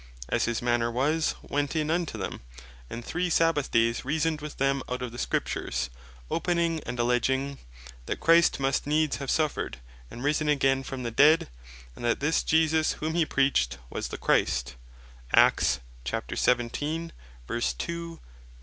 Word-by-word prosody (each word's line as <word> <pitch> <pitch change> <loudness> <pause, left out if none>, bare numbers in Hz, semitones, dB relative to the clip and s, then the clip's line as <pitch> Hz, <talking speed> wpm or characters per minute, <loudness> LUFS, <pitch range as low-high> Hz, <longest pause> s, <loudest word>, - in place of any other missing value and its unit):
"As - - +1
his 120 0 -2
manner 120 -1 +2
was, 150 +7 +1
went 145 +1 -2
in 155 0 0
unto 170 -8 -1
them, 95 - -5 0.5
and 120 0 -7
three 180 0 -1
Sabbath 165 -4 +2
dayes 115 0 +2
reasoned 155 +2 0
with 150 0 -7
them 135 0 +1
out 125 0 -3
of 125 - -4
the 120 - -8
Scriptures, - - -2 0.4
Opening 170 -1 +1
and 125 +1 -4
alledging, 130 +3 +1 0.5
that - - -2
Christ 165 -1 +4
must 135 +1 0
needs 155 0 +1
have 140 -2 -5
suffered 155 - 0 0.3
and 120 - -8
risen 150 +1 +1
again 135 -2 +3
from 130 -1 -6
the 120 - -3
dead; 150 - +5 0.5
and - - -10
that 120 0 +1
this 150 +3 +2
Jesus 160 0 +2
whom 155 +1 -3
he 165 -2 +2
preached 135 - +1
was - - -3
the - - -6
Christ." - - +1
140 Hz, 140 wpm, -27 LUFS, 125-160 Hz, 0.5 s, dead